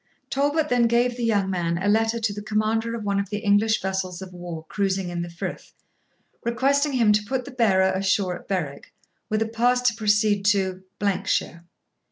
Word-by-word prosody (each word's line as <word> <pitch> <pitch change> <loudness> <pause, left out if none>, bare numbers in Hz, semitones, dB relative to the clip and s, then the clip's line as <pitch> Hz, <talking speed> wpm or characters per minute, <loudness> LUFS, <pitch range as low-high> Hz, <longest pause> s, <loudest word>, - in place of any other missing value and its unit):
Talbot 290 +3 +1
then 245 -1 +3
gave 240 +1 +2
the 240 - -4
young 205 -4 +2
man 170 -2 -1
a 190 +3 -2
letter 225 +2 +2
to 220 -2 -1
the 205 - -6
commander 220 +2 0
of 225 - -5
one 200 -1 0
of 200 -1 -3
the 210 - -2
English 210 +1 +2
vessels 190 -2 -2
of 190 -1 -9
war 175 -2 -7
cruising 195 -2 -1
in 175 -1 -3
the 170 - -5
frith, 170 - -7 0.7
requesting 275 +5 +1
him 230 -5 +4
to 210 0 +2
put 255 +3 -2
the 280 - -8
bearer 195 -7 +3
ashore 190 -1 +1
at - - -20
Berwick, 160 -8 -4 0.3
with 215 0 +1
a - - -5
pass 240 +2 +2
to 245 -1 +3
proceed 210 -2 +2
to 190 -2 +1 0.5
shire. 170 +1 -1
210 Hz, 195 wpm, -24 LUFS, 190-230 Hz, 0.7 s, him